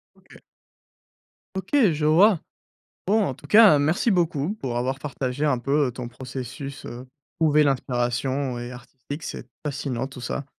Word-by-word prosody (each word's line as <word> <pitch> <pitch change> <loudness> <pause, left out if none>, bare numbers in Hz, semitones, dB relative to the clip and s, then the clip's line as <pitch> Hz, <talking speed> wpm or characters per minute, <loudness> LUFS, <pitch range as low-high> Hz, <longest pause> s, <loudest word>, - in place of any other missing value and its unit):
OK. - - -18 1.2
OK, 190 0 -5 0.2
je 150 0 -1
vois. 175 +5 +5 0.7
Bon, 215 +3 +3
en 135 - -2
tout 145 - -14
cas, 210 -3 +7
merci 155 +10 +2
beaucoup 170 -2 +1
pour 130 - -4
avoir 130 +2 -1
partagé 140 -1 -3
un 145 -4 +2
peu, 140 +3 +1
heu, - - -5
ton 120 0 -6
processus, 130 +2 -7
heu, 120 +2 -8 0.3
trouver 150 -2 +4
l'inspiration 130 0 -1
et 120 +1 -6
artistique, 130 +4 -9
c'est, - - -6 0.2
fascinant 140 -4 -3
tout 130 -1 -10
ça. 140 +3 -3
140 Hz, 155 wpm, -24 LUFS, 125-155 Hz, 1.2 s, cas